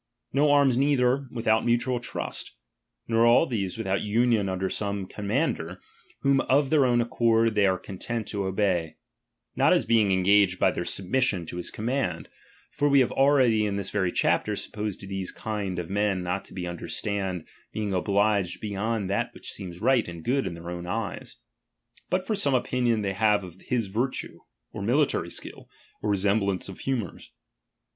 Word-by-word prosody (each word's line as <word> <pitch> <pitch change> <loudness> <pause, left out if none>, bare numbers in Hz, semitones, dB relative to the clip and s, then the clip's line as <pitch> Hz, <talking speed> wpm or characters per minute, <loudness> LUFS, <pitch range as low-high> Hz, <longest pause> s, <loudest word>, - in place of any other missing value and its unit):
Nor 145 +1 +4
arms 135 -4 +4
neither, 135 -1 +2
without 110 -2 +1
mutual 120 +1 +1
trust. 120 - -5 0.5
Nor 115 0 +3
all 120 +7 +6
these, 100 - -3
without 95 -3 -1
union 110 -1 +2
under 95 0 -1
some 100 0 -2
comman 110 - 0
der, 85 +3 -8 0.4
whom 140 -1 +3
of 135 +1 +3
their 145 -4 +4
own 120 -1 +3
accord 115 -1 +2
they 105 -2 +3
are 95 -1 +2
content 110 +5 -4
to 100 -2 -2
obey; 95 -5 0 0.6
not - - +4
as - - +2
being 110 -4 +3
engaged 95 0 +4
by - - +3
their - - -4
submission 100 -2 0
to 90 - -6
his 90 - -3
command; 110 -6 -2 0.4
(for 145 - +1
we 140 -1 +6
have 125 - +1
already 130 -6 +4
in 100 -1 -1
this 100 -1 -2
very 95 -3 0
cslapter, - - +1
supposed 105 -2 -4
these 95 -1 -4
kind 105 -4 -4
of 90 -2 -3
men 100 -1 0
not 90 +2 -2
to 90 -2 -6
under 85 -1 -6
stand 95 -5 -3 0.3
being 105 -2 -3
obliged 100 -1 +1
beyond 105 0 -2
that 100 +2 -1
which - - -6
seems 90 -1 -7
right 125 -4 +3
aa, - - -6
Tid 85 -1 -10
good 135 +6 0
in 85 - -5
their 85 +1 -7
own 90 0 -6
eyes); 110 +2 -4 0.7
but 185 +1 0
for 220 - -1
some 145 -10 +1
opinion 125 -3 +1
fciey 95 -1 -1
have 105 0 +2
of 90 0 -11
his 120 -3 0
virtue, 115 +7 -3 0.3
or 105 - -6
military 130 +8 +1
skill, - - -8 0.3
or 105 - 0
resem 100 +1 +2
X»]auce 95 - -3
of 95 - -9
humours. 120 - -3
105 Hz, 180 wpm, -26 LUFS, 95-120 Hz, 0.7 s, all